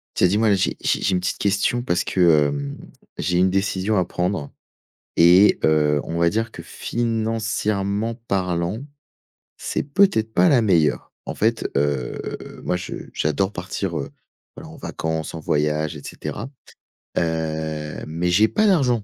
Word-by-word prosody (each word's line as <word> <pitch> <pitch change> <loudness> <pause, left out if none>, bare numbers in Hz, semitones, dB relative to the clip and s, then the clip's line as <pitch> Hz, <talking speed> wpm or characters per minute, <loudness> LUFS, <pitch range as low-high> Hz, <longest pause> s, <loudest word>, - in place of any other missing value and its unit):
Tiens, 90 - +4
dis-moi 105 +4 +2
là. 100 - +5
J'ai 95 - 0
j'ai - - +1
j'ai 100 - +1
une 90 - +1
petite 90 -1 -2
question 100 +4 +1
parce 90 -8 0
que, 80 -5 +4
hem, 70 -1 -4 0.4
j'ai 90 0 0
une 95 +1 +4
décision 95 +2 0
à 90 - +3
prendre 90 -4 -2 0.7
et 90 +4 +6
heu, 75 -1 +3
on 85 +1 -4
va 85 - +4
dire 110 +5 -1
que - - -10
financièrement 110 -2 -1
parlant, 90 +3 -1 0.7
c'est - - -2
peut-être 140 - +2
pas 180 - +4
la 135 -7 +4
meilleure. 85 -8 +2
En - - -4
fait, 115 +2 0
heu, 70 -3 0 0.5
moi, 90 - 0
je 90 - -6 0.2
j'adore 95 +6 0
partir, 90 -2 -3
heu, 70 -1 -5 0.5
alors, - - -10
en - - -11
vacances, 80 -1 -4
en 80 - -5
voyage 75 +1 0
et 75 - -9
cetera, - - -6 0.7
heu, 80 -2 -2
mais 85 +3 -1
j'ai 100 +5 +5
pas 215 - +1
d'argent! 130 - +3
90 Hz, 160 wpm, -22 LUFS, 80-110 Hz, 0.7 s, et